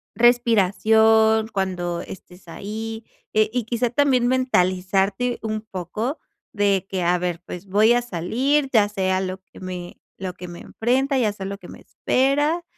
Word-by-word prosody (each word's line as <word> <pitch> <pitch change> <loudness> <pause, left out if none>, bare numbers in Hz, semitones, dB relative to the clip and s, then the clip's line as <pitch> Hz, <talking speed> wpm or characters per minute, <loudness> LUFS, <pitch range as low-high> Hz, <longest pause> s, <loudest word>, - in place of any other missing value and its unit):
respiración 220 -1 +4
cuando 180 -4 -2
estés 180 0 -12
ahí, 220 +5 -6 0.3
eh, 215 0 +3
y 245 -3 -1
quizá 235 +1 0
también 255 -2 +3
mentalizarte 200 -1 +1
un 215 -1 -2
poco 215 - -4 0.3
de 200 -2 +1
que 190 -1 -2
a 175 +1 +3
ver, 175 -1 -3
pues 180 +2 -8
voy 210 +4 +4
a 245 - +2
salir, 250 - 0
ya 210 -2 +5
sé 190 -2 -1
a 185 - +2
lo 185 0 -4
que - - -17
me 180 -1 -7 0.2
lo 185 -1 -4
que 180 0 -9
me 175 0 -9
enfrenta, 265 +4 0
ya 220 -5 +1
sé 205 - -8
a - - -4
lo 200 - -5
que 185 -3 -13
me - - -11
espera. 290 +6 +1
215 Hz, 170 wpm, -22 LUFS, 185-240 Hz, 0.3 s, ya